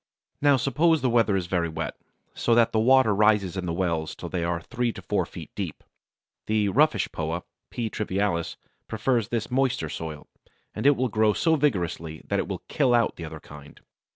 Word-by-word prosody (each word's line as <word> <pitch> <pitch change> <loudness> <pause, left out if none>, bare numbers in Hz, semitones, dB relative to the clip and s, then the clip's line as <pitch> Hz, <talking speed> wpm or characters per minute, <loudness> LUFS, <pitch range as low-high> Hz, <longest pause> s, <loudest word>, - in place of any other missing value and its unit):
Now 145 -1 +5
suppose 155 +5 +2
the 125 - +2
weather 115 -4 +3
is 90 - -2
very 85 -1 -1
wet, 80 0 -4 0.4
so 120 - +1
that 115 -1 +4
the 110 - +1
water 130 -1 +5
rises 105 -3 +3
in 90 -2 -3
the - - -1
wells 85 -3 -1
till - - -7
they 90 -2 -2
are 85 0 -1
three 120 +5 -2
to - - -9
four - - 0
feet - - -10
deep. - - -5 0.6
The 105 -1 +2
Roughish 150 +9 +2
Poa - - -3 0.3
(P. 120 -2 -3
trivialis) 100 -5 -1 0.3
prefers 110 0 0
this 115 0 -3
moister 125 - 0
soil, 80 -2 -6 0.5
and - - 0
it 145 - +6
will 130 0 0
grow 110 -1 +2
so 165 +7 +2
vigorously 85 - -1
that - - +1
it - - -2
will - - -5
kill 130 -5 +2
out 120 -1 +2
the 85 - -7
other 80 0 -8
kind. 75 -1 -13
110 Hz, 195 wpm, -26 LUFS, 85-125 Hz, 0.6 s, it